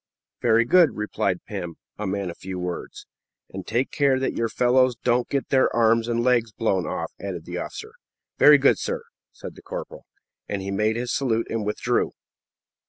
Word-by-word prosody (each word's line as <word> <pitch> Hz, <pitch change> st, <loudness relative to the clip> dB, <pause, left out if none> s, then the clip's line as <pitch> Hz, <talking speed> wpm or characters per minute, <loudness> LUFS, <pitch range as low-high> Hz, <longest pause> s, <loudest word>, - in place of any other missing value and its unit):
"Very 115 Hz, +1 st, +4 dB
good," 170 Hz, +4 st, +4 dB
replied 105 Hz, 0 st, -2 dB
Pim, 85 Hz, -2 st, -6 dB, 0.2 s
a 105 Hz, -, -2 dB
man 95 Hz, -1 st, -2 dB
of -, -, -12 dB
few 95 Hz, -1 st, -6 dB
words. 90 Hz, -1 st, -5 dB, 0.5 s
"And 95 Hz, 0 st, -7 dB
take 120 Hz, +4 st, 0 dB
care 140 Hz, -2 st, +2 dB
that 130 Hz, -, -1 dB
your 115 Hz, -1 st, 0 dB
fellows 125 Hz, +1 st, +3 dB
don't 120 Hz, +1 st, 0 dB
get 140 Hz, -1 st, -2 dB
their 130 Hz, -1 st, +3 dB
arms 115 Hz, 0 st, +3 dB
and 120 Hz, 0 st, 0 dB
legs 120 Hz, -3 st, +2 dB
blown 95 Hz, -3 st, 0 dB
off," -, -, -3 dB
added 90 Hz, -4 st, -5 dB
the 90 Hz, 0 st, -5 dB
officer. 435 Hz, 0 st, -7 dB, 0.5 s
"Very -, -, +9 dB
good, -, -, +3 dB
sir," 475 Hz, -1 st, -3 dB, 0.3 s
said -, -, -9 dB
the -, -, -15 dB
corporal; -, -, -8 dB, 0.4 s
and 100 Hz, -2 st, -3 dB
he 100 Hz, -, -4 dB
made 105 Hz, +3 st, +1 dB
his 120 Hz, +1 st, -2 dB
salute 115 Hz, -4 st, 0 dB
and 115 Hz, -1 st, -1 dB
withdrew. 105 Hz, -, 0 dB
115 Hz, 180 wpm, -24 LUFS, 100-130 Hz, 0.5 s, Very